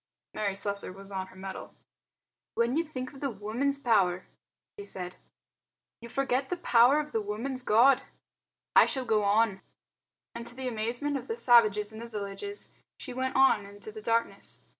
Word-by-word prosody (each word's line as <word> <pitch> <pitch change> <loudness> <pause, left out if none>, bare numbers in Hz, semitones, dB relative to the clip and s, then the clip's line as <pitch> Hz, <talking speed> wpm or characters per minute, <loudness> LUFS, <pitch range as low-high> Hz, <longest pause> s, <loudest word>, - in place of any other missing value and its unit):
Mary 200 -2 -1
Slessor 200 -1 -1
was 195 +1 -12
on 190 -1 -3
her 185 - -17
mettle. 190 0 -8 0.8
"When 235 +2 +1
you 330 - +2
think 255 -5 -6
of 275 - -12
the 280 - 0
woman's 235 +6 -2
power," 195 -9 +2 0.5
she - - -5
said 180 - -7
to - - -21
the - - -36
chief, - - -48
"you 235 - -9
forget 265 +1 0
the 360 - -2
power 250 +1 +5
of 300 0 -4
the 225 - 0
woman's 230 +6 -3
God. 245 +3 +5 0.7
I - - +8
shall 265 -2 -1
go 220 -2 +2
on." 205 -1 +2 0.7
And 235 0 -6
to 240 - -6
the 260 0 -4
amazement 245 +5 -2
of - - -8
the 455 - -2
savages 215 - +4
in 220 - -8
the 235 0 -8
villages 215 - -6 0.3
she 255 - -7
went 260 +1 -2
on 265 -6 +5
into 205 +1 -10
the 215 0 -9
darkness. 230 +1 -1
230 Hz, 185 wpm, -29 LUFS, 205-265 Hz, 0.8 s, I